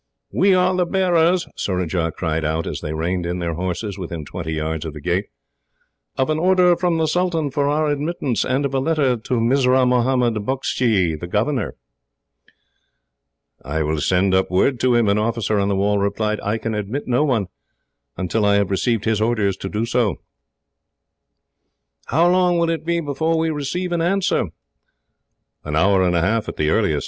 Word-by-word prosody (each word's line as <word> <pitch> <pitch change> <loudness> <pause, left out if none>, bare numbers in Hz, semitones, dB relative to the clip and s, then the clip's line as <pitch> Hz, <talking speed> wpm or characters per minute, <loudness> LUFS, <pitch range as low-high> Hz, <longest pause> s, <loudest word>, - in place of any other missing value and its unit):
"We 195 -1 +3
are 185 0 +2
the 180 -1 +1
bearers," 180 -1 +2
Surajah 90 -3 -2
cried 80 -2 -1
out, 80 +2 -1
as - - -5
they 75 - -4
reined 85 +3 -2
in 90 +1 -2
their 85 -2 -2
horses 95 +4 -4
within 85 -4 -6
twenty 80 0 -5
yards 80 0 -3
of 80 -2 -6
the - - -7
gate, 90 +6 -1 0.9
"of 135 +3 +1
an 155 - 0
order 180 0 +4
from 170 -1 0
the 160 - +1
sultan 165 -3 0
for 140 +1 0
our 155 +1 +1
admittance, 145 -3 -1
and 130 +2 0
of 135 - -3
a 135 - +1
letter 140 -3 +1
to 115 +2 -5
Mirzah 130 +2 +3
Mohammed 125 -1 +2
Bukshy, 115 -7 0
the 90 - -6
governor." 115 +8 -1 1.9
"I 80 +4 -2
will 75 0 -1
send 95 +3 +2
up 95 0 +2
word 120 +8 +1
to 125 -1 +2
him," 120 -2 +3
an 100 +1 +2
officer 110 -1 0
on 100 - +1
the 100 - 0
wall 100 +1 +1
replied. 105 +2 -1
"I 105 +2 -1
can 110 0 -4
admit 105 +7 -4
no 125 +3 +2
one, 125 -9 +1 0.7
until 95 +4 -1
I 100 0 +4
have 100 -1 +1
received 110 +2 0
his 110 -1 +1
orders 110 -4 +1
to 95 - -5
do 110 +3 -1
so." 115 -6 +1 1.9
"How 165 +4 +3
long 180 -1 +3
will 170 -1 +1
it 165 0 -4
be 170 0 +1
before 160 +2 -1
we 160 0 0
receive 155 +5 -3
an 170 -1 0
answer?" 190 +3 +1 1.2
"An 75 0 -4
hour 95 +4 +3
and 90 -1 +2
a 85 - +2
half, 110 +5 0
at - - -8
the 75 0 +1
earliest. - - +1
115 Hz, 185 wpm, -21 LUFS, 95-150 Hz, 1.9 s, order